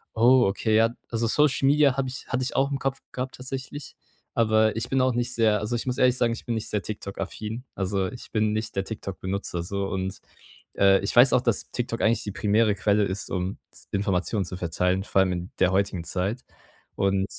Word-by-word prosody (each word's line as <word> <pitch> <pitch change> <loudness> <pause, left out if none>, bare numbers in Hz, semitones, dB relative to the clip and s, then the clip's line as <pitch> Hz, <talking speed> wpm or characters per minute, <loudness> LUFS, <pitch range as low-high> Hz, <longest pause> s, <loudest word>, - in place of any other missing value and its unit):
Oh, 120 +3 +6
okay, 105 +3 +1
ja, 115 +1 +5 0.2
also 115 0 -1
Social 140 +2 +3
Media 145 -2 +4
habe 135 -1 -1
ich 130 - -8
hatte 125 +1 -1
ich 125 - -3
auch 135 +1 +2
im 140 -1 -2
Kopf 135 0 -2
gehabt 130 +1 -4
tatsächlich. 130 +3 -6 0.4
Aber 110 -1 +3
ich 115 - -3
bin 135 - +1
auch 130 0 +2
nicht 120 +1 -1
sehr 110 -3 +3
also 105 +4 -2
ich 120 - -3
muss 125 -1 -2
ehrlich 125 0 +4
sagen, 115 -2 +2
ich 115 - -8
bin 120 - -1
nicht 110 - -4
sehr 105 - -1
TikTok-affin. 105 +3 -5
Also, 95 0 -1
ich 125 - -10
bin 110 -1 +1
nicht 110 +1 -3
der 95 - 0
TikTok-Benutzer 95 -3 -4
so 100 +2 -3
und, 95 -1 -3 0.6
äh, 95 0 +5
ich 100 - -2
weiß 125 +2 +8
auch, 125 - +4
dass 115 -5 -1
TikTok 120 -1 -3
eigentlich 115 +2 +2
die 105 - -4
primäre 105 +1 +2
Quelle 105 +2 +2
ist, 95 0 -3
um 90 +1 -2
z - - -12
Informationen 100 0 0
zu 90 - -6
verteilen, 90 +2 0
vor 95 - +1
allem 95 -1 +2
in 90 0 -5
der 90 - +4
heutigen 95 -2 0
Zeit. 95 +8 -2 0.5
Und 95 0 +1
110 Hz, 215 wpm, -25 LUFS, 95-125 Hz, 0.6 s, weiß